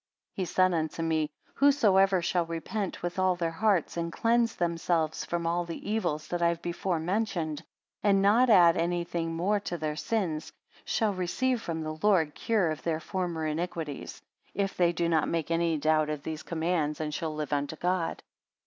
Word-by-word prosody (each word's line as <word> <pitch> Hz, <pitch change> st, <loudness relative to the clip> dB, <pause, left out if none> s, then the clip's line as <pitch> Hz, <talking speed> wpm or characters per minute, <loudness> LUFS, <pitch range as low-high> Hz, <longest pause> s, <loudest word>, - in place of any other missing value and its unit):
82 -, -, -4 dB
He -, -, 0 dB
said 185 Hz, +1 st, +2 dB
unto 160 Hz, 0 st, -2 dB
me, 160 Hz, -2 st, 0 dB, 0.2 s
Whosoever 195 Hz, -10 st, +4 dB
shall 175 Hz, -1 st, 0 dB
repent 175 Hz, +5 st, -4 dB
with 175 Hz, +1 st, -3 dB
all 185 Hz, -1 st, +3 dB
their 170 Hz, -2 st, -1 dB
hearts, 190 Hz, -1 st, +1 dB
and 170 Hz, 0 st, -2 dB
cleanse 230 Hz, +3 st, +2 dB
themselves 165 Hz, -2 st, 0 dB
from 170 Hz, -1 st, -2 dB
all 170 Hz, +1 st, +1 dB
the 170 Hz, +4 st, -6 dB
evils 155 Hz, -9 st, -1 dB
that 175 Hz, 0 st, -2 dB
I 170 Hz, -, +4 dB
have 170 Hz, 0 st, -1 dB
before 175 Hz, 0 st, -1 dB
mentioned, 170 Hz, -4 st, -2 dB, 0.4 s
and 200 Hz, -1 st, +4 dB
not 220 Hz, +6 st, +4 dB
add 175 Hz, -6 st, +7 dB
anything 170 Hz, -1 st, -1 dB
more 200 Hz, +5 st, +1 dB
to 175 Hz, -3 st, -4 dB
their 155 Hz, -1 st, -2 dB
sins, 165 Hz, -4 st, -2 dB, 0.3 s
shall 215 Hz, -2 st, +1 dB
receive 225 Hz, +7 st, 0 dB
from 165 Hz, -5 st, -4 dB
the 155 Hz, 0 st, -5 dB
Lord 175 Hz, -8 st, +3 dB
cure 205 Hz, -8 st, +1 dB
of 155 Hz, -, -5 dB
their 160 Hz, -2 st, -1 dB
former 175 Hz, -2 st, -3 dB
iniquities, 155 Hz, -2 st, -4 dB, 0.3 s
if 195 Hz, 0 st, -1 dB
they 175 Hz, -1 st, +3 dB
do 170 Hz, 0 st, -1 dB
not 160 Hz, -2 st, +2 dB
make 165 Hz, -1 st, -2 dB
any 165 Hz, -1 st, +1 dB
doubt 155 Hz, 0 st, +2 dB
of 150 Hz, -2 st, -4 dB
these 155 Hz, -1 st, -4 dB
commands, 160 Hz, -2 st, -1 dB
and 155 Hz, -1 st, -3 dB
shall 155 Hz, 0 st, -3 dB
live 150 Hz, -1 st, -3 dB
unto 145 Hz, +2 st, -1 dB
God. 175 Hz, 0 st, -1 dB
170 Hz, 185 wpm, -29 LUFS, 160-190 Hz, 0.4 s, add